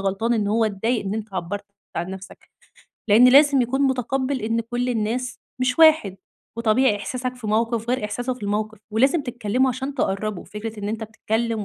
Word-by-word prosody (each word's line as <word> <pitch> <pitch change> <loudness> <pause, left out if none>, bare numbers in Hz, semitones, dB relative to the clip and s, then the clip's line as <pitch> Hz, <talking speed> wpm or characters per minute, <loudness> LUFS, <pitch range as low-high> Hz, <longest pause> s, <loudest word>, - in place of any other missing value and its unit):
غلطان 195 +5 0
إن 210 -2 0
هو 225 +1 +2
اتضايق 220 +3 -1
إن 195 +2 -2
أنت 215 -3 -6
عبّرت 200 +3 -4 0.3
عن 175 +2 -2
نفسك. 190 0 -11 0.6
لإن 235 +5 +7
لازم 280 0 +6
يكون 265 +3 -1
متقبّل 260 0 0
إن 230 +1 0
كل 240 +2 -3
الناس 240 +2 -2 0.2
مش 255 +3 0
واحد. 310 - +5 0.4
وطبيعي 230 0 +3
إحساسك 255 +4 -4
في 230 -3 -8
موقف 230 +2 0
غير 250 -3 0
إحساسه 245 +4 -2
في 245 - -15
الموقف. 210 +1 -2
ولازم 270 +7 +3
تتكلّموا 245 0 0
عشان 265 +3 -4
تقرّبوا. 200 -5 -2
فكرة 215 +1 -7
إن 205 - -3
أنت 220 +1 -3
بتتكلّم 220 0 -2
230 Hz, 175 wpm, -23 LUFS, 210-250 Hz, 0.6 s, لإن